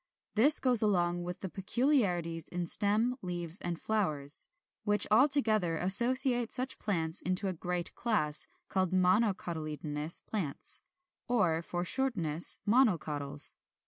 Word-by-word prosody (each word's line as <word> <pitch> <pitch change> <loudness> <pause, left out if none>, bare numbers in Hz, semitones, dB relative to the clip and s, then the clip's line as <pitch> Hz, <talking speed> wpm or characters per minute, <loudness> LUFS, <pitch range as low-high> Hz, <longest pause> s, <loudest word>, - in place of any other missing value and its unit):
This 275 +8 +5
goes 250 -4 +1
along 175 -4 -1
with 175 0 -8
peculiarities 190 - -2
in 180 0 -6
stem, 210 +7 0
leaves, 175 -1 -4
and 175 -1 -6
flowers, 155 -10 +1 0.3
which 210 -1 +2
all 245 +7 +4
together 215 - 0
associate 240 - +6
such 260 +1 0
plants 165 -6 0
into 185 +3 -3
a 190 - -4
great 175 +1 -5
class, 155 -11 -1 0.2
called 185 -1 -3
MONOCOTYLEDONOUS 170 -6 -2
PLANTS, 180 -11 -1 0.5
or, 180 -10 -1
for 175 +1 -6
shortness, 175 - +3
MONOCOTYLS. 155 - +1
185 Hz, 115 wpm, -29 LUFS, 165-225 Hz, 0.5 s, associate